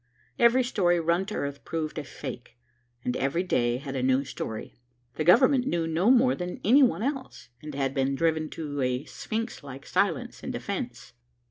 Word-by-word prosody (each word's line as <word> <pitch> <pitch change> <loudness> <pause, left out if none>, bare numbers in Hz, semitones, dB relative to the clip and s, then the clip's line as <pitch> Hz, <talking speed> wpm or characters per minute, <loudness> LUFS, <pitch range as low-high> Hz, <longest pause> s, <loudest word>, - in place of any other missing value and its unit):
Every 235 +2 +5
story 180 -8 +2
run 170 +3 +1
to 215 - -4
earth 140 0 -4
proved 155 -1 -3
a - - -4
fake, 125 -5 -8 0.5
and 125 - 0
every 140 +7 0
day 120 -9 +1
had 135 0 -6
a 130 - -1
new 130 +2 +2
story. 110 -4 -6 0.4
The 155 - -2
Government 255 - +5
knew 170 -7 0
no 165 +6 +2
more 255 0 +5
than 180 0 -5
any 255 +8 +6
one 240 -5 +3
else, 260 - -4
and 150 -2 -7
had 135 -1 -1
been 135 0 +1
driven 160 0 +1
to 145 -3 -4
a 125 +2 0
sphinx 225 +6 -4
like 135 -1 -9
silence - - 0
in - - -4
self - - -6
defence. - - -5
160 Hz, 190 wpm, -27 LUFS, 135-215 Hz, 0.5 s, any